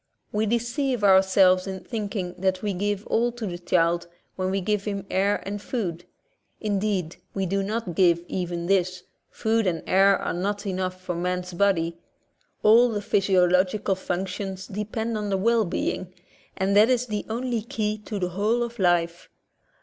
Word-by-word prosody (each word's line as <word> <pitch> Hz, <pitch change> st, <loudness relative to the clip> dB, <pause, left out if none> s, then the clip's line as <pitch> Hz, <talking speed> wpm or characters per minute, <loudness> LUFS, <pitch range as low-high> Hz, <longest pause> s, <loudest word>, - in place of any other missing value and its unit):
We 215 Hz, +1 st, 0 dB
deceive 240 Hz, +2 st, -1 dB
ourselves 190 Hz, -1 st, +5 dB
in 190 Hz, -1 st, -5 dB
thinking 200 Hz, -4 st, -4 dB
that 190 Hz, 0 st, 0 dB
we 205 Hz, -1 st, 0 dB
give 205 Hz, +2 st, -2 dB
all 240 Hz, +1 st, +1 dB
to 240 Hz, -2 st, -5 dB
the 175 Hz, -3 st, -5 dB
child 175 Hz, -1 st, +1 dB, 0.3 s
when 185 Hz, 0 st, -1 dB
we 195 Hz, +1 st, 0 dB
give 205 Hz, +1 st, -1 dB
him 200 Hz, -2 st, -3 dB
air 200 Hz, +2 st, +1 dB
and. 200 Hz, +1 st, -4 dB
food. 180 Hz, -8 st, -3 dB, 0.5 s
Indeed, 200 Hz, -5 st, -1 dB, 0.2 s
we 195 Hz, -1 st, 0 dB
do 195 Hz, +2 st, 0 dB
not 215 Hz, -1 st, -3 dB
give 170 Hz, -1 st, +3 dB
even 175 Hz, -2 st, -3 dB
this; 185 Hz, -1 st, +1 dB, 0.3 s
food 225 Hz, -2 st, 0 dB
and 165 Hz, -3 st, -1 dB
air 195 Hz, +1 st, +5 dB
are -, -, -3 dB
not 205 Hz, +4 st, -2 dB
enough 185 Hz, -1 st, -2 dB
for 185 Hz, -1 st, -4 dB
man's 180 Hz, +1 st, -2 dB
body; 170 Hz, -3 st, +1 dB, 0.6 s
all 235 Hz, +3 st, +6 dB
the 215 Hz, -3 st, -2 dB
physiological 190 Hz, 0 st, +2 dB
functions 190 Hz, +1 st, -4 dB
depend 215 Hz, +3 st, -3 dB
on 210 Hz, -1 st, -3 dB
the 195 Hz, -, +1 dB
well 225 Hz, +2 st, +2 dB
being, 180 Hz, +1 st, -2 dB, 0.5 s
and 195 Hz, +1 st, +1 dB
that 215 Hz, +3 st, +6 dB
is 250 Hz, -1 st, +2 dB
the 210 Hz, -3 st, -3 dB
only 240 Hz, 0 st, -1 dB
key 215 Hz, -1 st, -2 dB
to 210 Hz, 0 st, -6 dB
the 180 Hz, -2 st, -1 dB
whole 210 Hz, +6 st, +1 dB
of 235 Hz, -1 st, -6 dB
life. 175 Hz, -2 st, +1 dB
195 Hz, 165 wpm, -25 LUFS, 180-215 Hz, 0.6 s, all